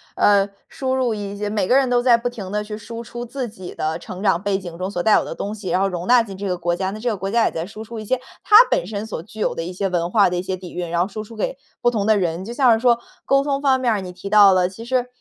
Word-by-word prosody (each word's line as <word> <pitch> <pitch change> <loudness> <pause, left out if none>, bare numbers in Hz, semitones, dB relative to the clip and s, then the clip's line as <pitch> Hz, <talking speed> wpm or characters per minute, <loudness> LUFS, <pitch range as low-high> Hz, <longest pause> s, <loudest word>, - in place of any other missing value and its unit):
呃， 200 -1 +4 0.2
输 260 -1 -3
入 250 -4 0
一 205 -1 -5
些 205 0 -3
每 205 -3 0
个 255 - +4
人 270 -2 +3
都 245 -1 +3
在 245 -2 +6
不 245 +1 -2
停 200 -6 -8
地 210 0 -1
去 210 0 -6
输 230 +2 -8
出 240 +1 -7
自 250 +1 -4
己 185 -4 -9
的 160 +1 -2
成 180 +2 -9
长 190 -5 +2
背 200 -1 0
景 175 -3 -8
中 185 +2 -3
所 180 - -2
带 215 +4 +4
有 - - +2
的 - - -5
东 205 +2 -5
西， 205 -3 -6
然 185 - +1
后 195 - +3
容 180 -1 -4
纳 245 -1 +6
进 195 -4 -7
这 200 0 -4
个 180 - 0
国 175 0 -1
家。 190 +1 -2
那 215 - -7
这 240 +2 -1
个 210 - -2
国 195 +2 -4
家 235 0 +3
也 - - +1
在 165 0 -4
输 215 +3 -9
出 230 +1 -9
一 215 - -7
些 260 +3 0 0.2
它 420 - +4
本 170 - +1
身 210 +2 -5
所 185 - -5
具 215 +2 -13
有 - - 0
的 165 - -3
一 180 +2 -6
些 195 +1 -1
文 175 -1 -1
化 205 -4 +5
的 180 - -2
一 180 - -2
些 190 0 -2
底 180 -1 -10
蕴， 175 -1 -4
然 170 0 +1
后 180 - +1
输 215 +1 -6
出 225 +1 -12
给 220 +5 -3 0.2
不 240 - +4
同 215 -4 -1
的 215 -1 +4
人。 175 +1 -2
就 235 - -6
像 250 -1 +4
是 225 - +1
说 235 -1 +3 0.3
沟 275 0 +3
通 280 -1 -1
方 265 -2 +3
面 245 - +2
儿 210 -3 0
你 180 -1 -7
提 185 +2 -8
到 205 -2 +7
了， 180 -1 +3
其 195 +5 -10
实 250 0 0
205 Hz, 355 characters per minute, -21 LUFS, 185-235 Hz, 0.3 s, 到